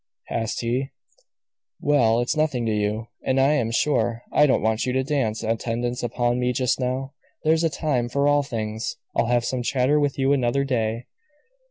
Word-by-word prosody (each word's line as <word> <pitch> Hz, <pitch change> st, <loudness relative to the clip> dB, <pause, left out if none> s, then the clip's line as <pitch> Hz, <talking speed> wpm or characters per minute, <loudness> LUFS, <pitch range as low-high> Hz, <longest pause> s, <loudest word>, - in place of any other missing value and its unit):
asked 115 Hz, -1 st, -2 dB
he. 125 Hz, +3 st, -1 dB, 0.9 s
"Well, 120 Hz, -6 st, +3 dB
it's 125 Hz, +7 st, -1 dB
nothing 145 Hz, -6 st, 0 dB
to 110 Hz, -, 0 dB
you. 105 Hz, +2 st, -1 dB
And 130 Hz, 0 st, +1 dB
I 135 Hz, +3 st, +4 dB
am 120 Hz, -7 st, +1 dB
sure 120 Hz, -2 st, 0 dB
I 150 Hz, -, +5 dB
don't 130 Hz, -, +2 dB
want 110 Hz, 0 st, +1 dB
you 125 Hz, -, 0 dB
to 130 Hz, 0 st, +1 dB
dance 130 Hz, -7 st, -1 dB
attendance 115 Hz, +2 st, -2 dB
upon 120 Hz, +1 st, 0 dB
me 125 Hz, 0 st, +1 dB
just 125 Hz, 0 st, 0 dB
now. 130 Hz, +2 st, -2 dB, 0.3 s
There's 160 Hz, +1 st, +3 dB
a 165 Hz, -, +3 dB
time 140 Hz, -5 st, -1 dB
for 140 Hz, +3 st, +1 dB
all 145 Hz, 0 st, +4 dB
things. 115 Hz, +2 st, -4 dB, 0.2 s
I'll -, -, +2 dB
have 120 Hz, 0 st, +2 dB
some 125 Hz, +1 st, -1 dB
chatter 130 Hz, +3 st, +2 dB
with 145 Hz, -2 st, 0 dB
you 135 Hz, +1 st, +2 dB
another 130 Hz, 0 st, +1 dB
day." 115 Hz, -3 st, -1 dB
125 Hz, 185 wpm, -24 LUFS, 115-140 Hz, 0.9 s, I